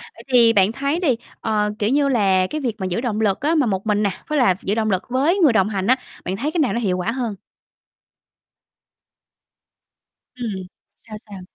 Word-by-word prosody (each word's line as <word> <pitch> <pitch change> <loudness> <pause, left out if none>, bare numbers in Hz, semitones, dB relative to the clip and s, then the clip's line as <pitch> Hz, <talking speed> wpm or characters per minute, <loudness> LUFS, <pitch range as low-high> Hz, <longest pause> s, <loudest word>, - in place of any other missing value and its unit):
Vậy - - -13
thì 235 -2 +6
bạn 200 0 +4
thấy 280 +7 -1
đi, 280 -10 +2 0.2
ờ, 210 -1 0
kiểu 210 +1 +1
như 280 +1 +2
là, 195 -6 +2
cái 305 +9 -4
việc 240 -5 -2
mà 190 - -3
giữ 185 +5 -2
động 220 -4 -2
lực 200 -3 +1
á, 310 +4 +1
mà 295 -5 +3
một 195 -1 -2
mình 210 0 +1
nè, 200 - +1 0.2
với 305 -1 -1
là 190 -8 +4
giữ 200 - -1
động 220 -1 0
lực 190 -1 0
với 295 +10 +1
người 295 -9 +5
đồng 200 -1 +2
hành 195 -2 -2
á, 255 - +5 0.3
bạn 190 +2 -2
thấy 295 +7 -2
cái 340 - -2
nào 275 - +2
nó 235 - -1
hiệu 190 -5 0
quả 185 +5 -1
hơn? 235 -4 -3 3.0
Ừm. 200 -7 -5 0.3
Sao 215 -2 -11
sao? 200 -2 -9
220 Hz, 215 wpm, -21 LUFS, 195-260 Hz, 3.0 s, thì